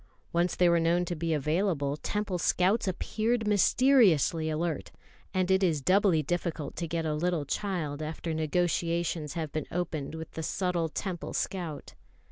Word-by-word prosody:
Once 175 +1 +1
they 180 - +4
were 170 0 +4
known 170 +2 +2
to 175 - -3
be 165 +1 -2
available, 150 -1 0
Temple 195 +4 -2
scouts 190 +6 +2
appeared 220 +5 -1
mysteriously 205 - +4
alert; 155 0 -2 0.4
and 185 -1 +1
it 190 0 +4
is 165 -6 +2
doubly 185 0 +3
difficult 165 -2 -3
to 170 - -2
get 165 0 -2
a 155 - 0
little 165 -1 0
child 155 -4 -2
after 160 +1 -4
negotiations 165 -1 0
have 160 -3 -3
been 155 -2 -3
opened 160 -4 -3
with 160 0 -7
the 160 - -5
subtle 175 0 -1
Temple 175 +1 -4
scout. 170 -7 -4
170 Hz, 155 wpm, -29 LUFS, 155-185 Hz, 0.4 s, they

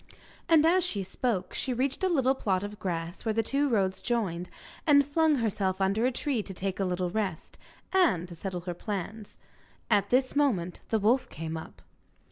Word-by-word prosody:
And 320 -2 +6
as 360 +2 +4
she 200 -9 -1
spoke 190 -1 -2
she 255 -2 -2
reached 270 +7 -1
a 375 - +3
little 265 -6 +3
plot 195 -7 0
of 205 0 -6
grass, 170 -1 -4
where 220 - 0
the 225 - +2
two 280 +5 +1
roads 190 -5 +1
joined, 190 -8 -1 0.4
and 285 -2 +6
flung 310 +2 +3
herself 200 -6 0
under 200 +5 +2
a - - +1
tree 260 -2 -1
to 195 -2 -9
take 190 +1 -3
a 195 - +1
little 180 -1 -1
rest, 190 -5 -3 0.3
and 315 - +3
to 175 - -9
settle 180 +1 -5
her 175 0 -4
plans. 205 +3 -5 0.5
At 205 -2 +3
this 255 +2 +2
moment 205 -12 +1
the 220 - +2
wolf 230 +5 +2
came 160 +1 -5
up. 105 - -9
210 Hz, 190 wpm, -29 LUFS, 185-260 Hz, 0.5 s, And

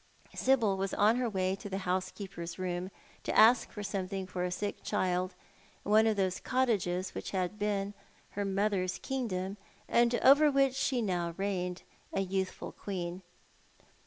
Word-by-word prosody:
Sibyl 230 -7 +2
was 195 0 -2
on 215 +3 +4
her 250 -2 0
way 190 -2 0
to 205 - -8
the 195 - -2
housekeeper's 185 -1 -3
room, 180 0 -3 0.3
to - - -2
ask 225 +3 +6
for 210 - -6
something 195 -1 -3
for 185 -1 -4
a 180 - 0
sick 205 +3 -3
child 185 -2 -1 0.5
in 205 - -2
one 220 +1 +6
of 220 - +2
those 190 -2 0
cottages 195 -8 0
which - - -5
had 190 +1 -2
been 205 -1 -1 0.4
her 205 - -2
mother's 195 -2 0
kingdom, 200 -7 -3 0.3
and 235 0 +3
over 290 +3 +7
which 275 -2 +3
she 255 -2 0
now 175 -4 -1
reigned, 185 -2 -2 0.3
a 195 - +1
youthful 190 0 -2
queen. 180 -2 -5
195 Hz, 160 wpm, -31 LUFS, 185-215 Hz, 0.5 s, over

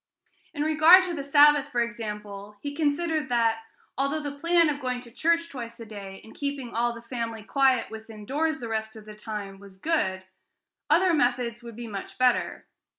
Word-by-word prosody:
In 290 - -1
regard 315 +4 +7
to 360 -2 -3
the 290 -4 -4
Sabbath, 290 0 +5
for 245 - 0
example, 210 -3 -5
he 285 +4 -5
considered 310 -1 0
that, 230 -2 +2 0.4
although 275 +3 +1
the 290 - -3
plan 335 +3 +3
of 290 -1 -2
going 250 -1 -2
to 240 -1 -14
church 335 +6 +1
twice 235 -4 -8
a 230 - -8
day, 200 -3 -9
and 220 - -14
keeping 280 -4 -4
all 240 +1 +1
the 230 - -11
family 230 -2 -5
quiet 260 0 +2
within 220 -1 -10
doors 310 +5 -1
the 235 - -5
rest 220 0 -3
of 215 -1 -11
the 215 - -10
time, 210 -2 -7
was 195 -1 -14
good, 190 - -1 0.7
other 365 0 +4
methods 245 -4 0
would 235 -2 -10
be 240 +1 -7
much 200 -3 -7
better. 255 -1 +1
245 Hz, 190 wpm, -26 LUFS, 220-295 Hz, 0.7 s, regard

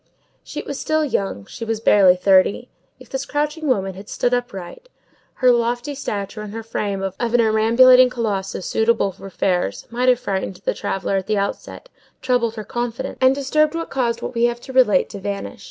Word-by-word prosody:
She - - -6
was 280 - -6
still 310 0 +1
young; 195 - -2
she - - -9
was 225 -1 -2
barely 195 -4 +5
thirty. 190 +5 +3 0.3
If 255 - -15
this 265 0 -3
crouching 300 +2 -2
woman 195 -7 0
had 195 +3 -11
stood 245 - 0
upright, 245 - -5 0.5
her 255 -1 +4
lofty 240 +4 0
stature 215 -6 -5
and 210 -1 -7
her 225 - -5
frame 200 -3 -3
of 195 -1 -2
a 240 - 0
perambulating 235 +3 +5
colossus 200 -6 -3
suitable 220 -3 +1
for 195 - -11
fairs, 180 - -1
might 250 +2 +1
have 250 -1 +4
frightened 190 -4 -3
the - - +1
traveller 195 0 -2
at 190 - -4
the 215 - 0
outset, 200 - -4 0.3
troubled 240 -3 0
her 215 - -5
confidence, 240 +2 -4
and 260 +1 +5
disturbed 300 +3 +1
what 330 0 -4
caused 235 -3 -1
what - - -4
we 235 0 +2
have 240 0 -1
to 265 - -10
relate 240 -8 +4
to 205 - -7
vanish. 200 +4 -5
230 Hz, 190 wpm, -21 LUFS, 200-255 Hz, 0.5 s, barely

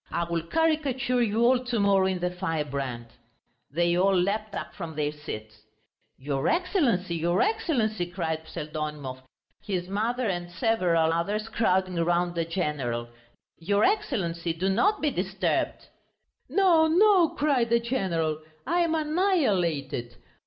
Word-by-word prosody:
"I 170 - -1
will 170 -1 -2
caricature 270 - 0
you 230 0 +2
all 250 +1 +4
to 240 -2 -1
morrow 195 -2 +3
in 190 -1 0
the 180 0 -2
Firebrand." 140 -8 -3 0.6
They 170 +3 +1
all 190 +1 +3
leapt 205 +3 -1
up - - -5
from 165 -5 -7
their 150 -1 -1
seats. 110 -8 -8 0.6
"Your 135 0 -2
Excellency, 280 - +1
your 170 +2 +1
Excellency!" 230 - 0
cried 160 -3 -3
Pseldonimov, 150 -4 -5 0.4
his 180 -4 -3
mother 235 +5 -1
and 175 -2 -3
several 175 -5 +1
others, 205 +6 -1
crowding 185 -5 +1
round 175 +1 +1
the 165 -1 -1
general; 140 -9 -2 0.5
"your 200 +5 +1
Excellency, 170 - 0
do 180 +4 -1
not 395 - +2
be 300 - +2
disturbed!" 190 -2 -2 0.6
"No, 345 -5 +4
no," 360 0 +5
cried 275 -6 +1
the 235 0 +4
general, 175 -11 -1 0.3
"I 350 - +1
am 335 -2 +2
annihilated.... 195 - 0
185 Hz, 135 wpm, -27 LUFS, 165-245 Hz, 0.6 s, no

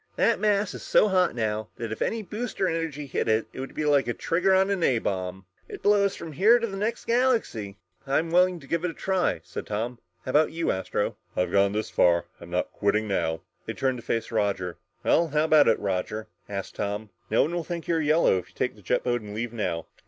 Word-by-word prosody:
"That - - +2
mass 205 -2 +1
is - - -7
so 210 - +4
hot 185 -5 +2
now, 110 -2 -1
if 110 -2 -5
any 225 -1 -1
booster 210 0 -2
energy 165 -4 -2
hit 135 - -2
it, 110 0 +2
it - - -8
would 135 - -6
be 155 - -1
like 145 -3 +3
a 120 - -1
trigger 180 +3 +1
on 190 +1 +3
a 130 -7 +3
bomb. 95 -2 -3 0.2
It'd - - -8
blow 205 0 +5
us 200 0 +1
from 165 - -7
here 210 - +5
to 230 - -1
the 200 -4 -5
next 215 +4 -2
galaxy!" 230 - +1 0.3
"I'm 160 +5 +1
willing 180 0 +4
to 165 +5 -2
try 190 +1 +1
it," - - -11
said - - -7
Tom. 115 +3 -3 0.3
"How 130 - -2
about 150 +3 +4
you, 165 +1 0
Astro?" 95 0 -2 0.2
"I've 90 -1 +1
gone 100 +1 +3
this 110 +1 -2
far, 85 -1 +5
and 85 - -3 0.2
I'm - - -14
not 90 +1 -1
quitting 105 +1 0
now." 80 -5 -1 0.3
They - - -2
turned 130 -1 -1
to - - -11
face 115 0 -2
Roger. 100 -5 -1 0.3
"Well, 170 - +3
how 150 0 +1
about 155 -2 +5
it, 110 - +4
Roger?" 100 +2 -2 0.2
asked 100 -1 -5
Tom. 105 +1 -3 0.2
"No 110 - +4
one 160 - -2
will 175 -1 -1
think 170 0 -5
you're 165 -1 +1
yellow 155 - +3
if 90 - -11
you - - -25
take - - -1
the - - -17
jet - - 0
boat 120 -1 0
and 105 -1 -8
leave 120 +1 -3
now." 90 -7 -2
135 Hz, 230 wpm, -26 LUFS, -, 0.3 s, blow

